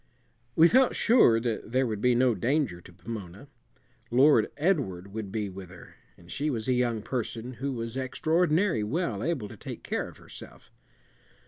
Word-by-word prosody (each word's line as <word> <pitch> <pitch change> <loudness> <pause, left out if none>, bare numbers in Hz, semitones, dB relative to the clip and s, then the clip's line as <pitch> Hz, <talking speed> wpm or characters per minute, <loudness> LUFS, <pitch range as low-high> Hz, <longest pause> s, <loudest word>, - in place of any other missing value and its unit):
We 165 - +7
felt 255 +6 +4
sure 220 - +5
that 115 -2 -3
there 130 +1 +3
would 110 -3 -3
be 125 +1 +3
no 125 0 +3
danger 115 - -1
to 90 - -14
Pomona. 100 +3 -8 0.6
Lord 135 +5 +4
Edward 120 - -1
would 105 -3 -5
be 105 -1 -2
with 95 -2 -9
her, 90 -1 -14 0.2
and 85 0 -16
she 150 +2 -1
was 115 -5 -3
a 130 - +3
young 120 -3 0
person 120 0 -4
who 135 +3 -4
was 115 -1 -5
extraordinary 160 - +1
well 115 - -2
able 145 -10 -2
to - - -11
take - - -8
care - - -2
of - - -13
herself. - - -13
120 Hz, 175 wpm, -28 LUFS, 105-145 Hz, 0.6 s, We